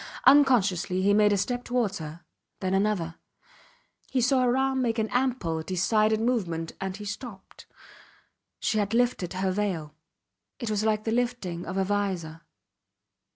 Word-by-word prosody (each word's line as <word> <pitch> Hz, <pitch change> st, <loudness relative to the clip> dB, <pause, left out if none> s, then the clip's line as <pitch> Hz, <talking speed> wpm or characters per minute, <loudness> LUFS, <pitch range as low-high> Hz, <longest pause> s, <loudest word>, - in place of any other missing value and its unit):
Unconsciously 210 Hz, -, +4 dB
he 200 Hz, +1 st, +4 dB
made 210 Hz, 0 st, +5 dB
a 205 Hz, -, +3 dB
step 245 Hz, +5 st, -1 dB
towards 240 Hz, -7 st, -1 dB
her 155 Hz, +2 st, -8 dB, 0.4 s
then 190 Hz, -1 st, -1 dB
another. 195 Hz, -5 st, 0 dB, 0.9 s
He 265 Hz, -, 0 dB
saw 255 Hz, +2 st, +3 dB
her 250 Hz, 0 st, +2 dB
arm 265 Hz, 0 st, +1 dB
make 230 Hz, -2 st, 0 dB
an 220 Hz, -1 st, 0 dB
ample, 245 Hz, -11 st, 0 dB
decided 215 Hz, +5 st, +1 dB
movement 185 Hz, -9 st, -1 dB
and 190 Hz, 0 st, -3 dB
he 210 Hz, -, -8 dB
stopped. 205 Hz, -1 st, -8 dB, 0.9 s
She 215 Hz, -, 0 dB
had 205 Hz, +2 st, 0 dB
lifted 240 Hz, -8 st, +1 dB
her 185 Hz, 0 st, 0 dB
veil. 185 Hz, -7 st, -2 dB, 0.6 s
It 235 Hz, -3 st, -4 dB
was 210 Hz, 0 st, 0 dB
like 215 Hz, -1 st, +1 dB
the 225 Hz, -, -1 dB
lifting 235 Hz, -8 st, -2 dB
of 185 Hz, +2 st, -4 dB
a 195 Hz, -, +2 dB
vizor. 185 Hz, -5 st, -2 dB
205 Hz, 155 wpm, -27 LUFS, 185-240 Hz, 0.9 s, made